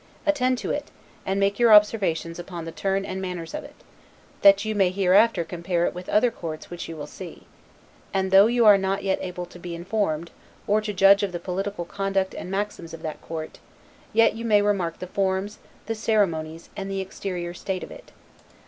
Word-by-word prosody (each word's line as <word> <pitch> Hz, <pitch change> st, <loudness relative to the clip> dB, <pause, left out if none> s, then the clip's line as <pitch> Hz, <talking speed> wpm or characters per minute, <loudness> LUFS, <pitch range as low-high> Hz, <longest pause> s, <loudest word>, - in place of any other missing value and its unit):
Attend 255 Hz, -4 st, +2 dB
to 205 Hz, -, -3 dB
it, 290 Hz, -, -3 dB, 0.4 s
and 195 Hz, +1 st, 0 dB
make 200 Hz, +2 st, +1 dB
your 235 Hz, -2 st, +5 dB
observations 195 Hz, -6 st, +4 dB
upon 175 Hz, -2 st, -7 dB
the 165 Hz, -, -6 dB
turn 195 Hz, +2 st, -1 dB
and 190 Hz, 0 st, -4 dB
manners 180 Hz, -3 st, -5 dB
of 300 Hz, -, -4 dB
it, -, -, -13 dB, 0.7 s
that 200 Hz, +1 st, +6 dB
you 215 Hz, -, -1 dB
may 195 Hz, -3 st, +3 dB
hereafter 195 Hz, +1 st, +3 dB
compare 175 Hz, 0 st, -1 dB
it -, -, -1 dB
with 180 Hz, +1 st, -8 dB
other 235 Hz, +3 st, +3 dB
courts 160 Hz, -5 st, -7 dB
which 175 Hz, -1 st, -6 dB
you 165 Hz, -, -6 dB
will 145 Hz, -, -5 dB
see; 175 Hz, +3 st, -10 dB, 0.7 s
And, 190 Hz, -1 st, -1 dB
though 195 Hz, +2 st, +8 dB
you 240 Hz, 0 st, +2 dB
are 205 Hz, -2 st, +8 dB
not 195 Hz, +1 st, -1 dB
yet 195 Hz, -1 st, 0 dB
able 180 Hz, -1 st, -5 dB
to 175 Hz, -, -14 dB
be 175 Hz, -1 st, -6 dB
informed, 170 Hz, -3 st, -2 dB, 0.3 s
or 210 Hz, +1 st, +2 dB
to 215 Hz, 0 st, -3 dB
judge 195 Hz, 0 st, +6 dB
of 200 Hz, -3 st, -2 dB
the 175 Hz, -, -3 dB
political 185 Hz, +1 st, -3 dB
conduct 195 Hz, +1 st, -1 dB
and -, -, -7 dB
maxims 195 Hz, -4 st, -4 dB
of 160 Hz, -, -14 dB
that 155 Hz, -1 st, -5 dB
court, 160 Hz, -1 st, -7 dB, 0.5 s
yet 225 Hz, +1 st, +4 dB
you 225 Hz, +1 st, -7 dB
may 210 Hz, -3 st, +4 dB
remark 190 Hz, -5 st, 0 dB
the -, -, -6 dB
forms, 190 Hz, +2 st, -2 dB, 0.3 s
the 225 Hz, -, -2 dB
ceremonies, 170 Hz, -8 st, -1 dB
and 195 Hz, -1 st, -5 dB
the 195 Hz, 0 st, -2 dB
exterior 185 Hz, -2 st, -5 dB
state 185 Hz, +1 st, -4 dB
of -, -, -9 dB
it. -, -, -13 dB
195 Hz, 200 wpm, -25 LUFS, 175-205 Hz, 0.7 s, though